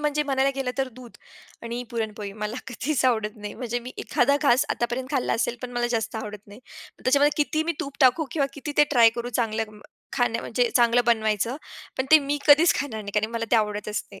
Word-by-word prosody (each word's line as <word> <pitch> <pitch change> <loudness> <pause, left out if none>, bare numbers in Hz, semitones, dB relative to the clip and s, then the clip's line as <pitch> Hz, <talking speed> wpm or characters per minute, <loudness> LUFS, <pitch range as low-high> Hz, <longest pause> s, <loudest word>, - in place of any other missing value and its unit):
म्हणजे 300 0 0
म्हणायला 270 -1 +1
गेलं 270 -2 -2
तर 265 -1 0
दूध 245 0 -13 0.5
आणि 235 +1 -4
पुरणपोळी 215 -3 -4
मला 210 +3 -3
कधीच 260 +2 -2
आवडत 220 -3 +1
नाही. 210 0 -7
म्हणजे 245 -1 -3
मी 250 +2 -9
एखादा 280 +3 +2
घास 270 -3 +4
आतापर्यंत 240 +2 -2
खाल्ला 270 -4 0
असेल, 235 +1 -1
पण 250 - -5
मला 240 0 0
जास्त 225 0 -3
आवडत 210 -1 -9
नाही. 205 +4 -13 0.4
त्याच्यामध्ये 285 +3 +3
किती 310 +1 -1
मी 335 - 0
तूप 280 0 -7
टाकू 265 +4 +5
किंवा 285 -4 0
किती 285 +1 -6
ते 295 - +7
ट्राय 235 -4 +6
करू 235 0 -3
चांगलं 220 -1 -3 0.3
खाणं, 245 -3 0
म्हणजे 240 +1 0
चांगलं 240 0 +4
बनवायचं, 220 +2 +1 0.4
पण 260 - 0
ते 315 - +9
मी 290 0 -2
कधीच 310 +4 +6
खाणार 235 -7 -4
नाही 200 0 -7
कारण 215 +1 -2
मला 230 0 -2
ते 235 - +5
आवडतच 210 0 -1
नाही. 195 - -12
245 Hz, 205 wpm, -25 LUFS, 220-275 Hz, 0.5 s, ते